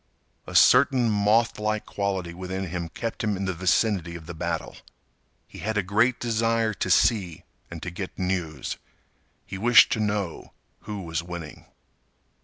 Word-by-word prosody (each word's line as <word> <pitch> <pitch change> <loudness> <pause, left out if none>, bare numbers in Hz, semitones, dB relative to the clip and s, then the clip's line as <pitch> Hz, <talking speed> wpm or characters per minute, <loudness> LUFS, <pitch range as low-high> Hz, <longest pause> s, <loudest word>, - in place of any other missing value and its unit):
A - - -8
certain 125 -3 +5
mothlike 105 +1 +1
quality 95 -4 -3
within 95 +1 -5
him 85 -1 -4
kept 115 +6 -5
him 105 -3 0
in 95 - -3
the 95 - -1
vicinity 90 0 +1
of 85 -2 -9
the 85 - -7
battle. 80 - -4 0.7
He - - -12
had 110 0 -2
a 105 - +2
great 110 +6 +2
desire 115 -1 +1
to 95 - -3
see, 90 -1 +2 0.3
and 85 -1 -8
to 90 - -4
get 90 +2 -7
news. 90 -7 -3 0.7
He 95 - -7
wished 120 0 +6
to - - 0
know 100 -5 -2 0.3
who 105 -2 -5
was 80 -1 -3
winning. 85 -3 -9
95 Hz, 155 wpm, -25 LUFS, 85-110 Hz, 0.7 s, wished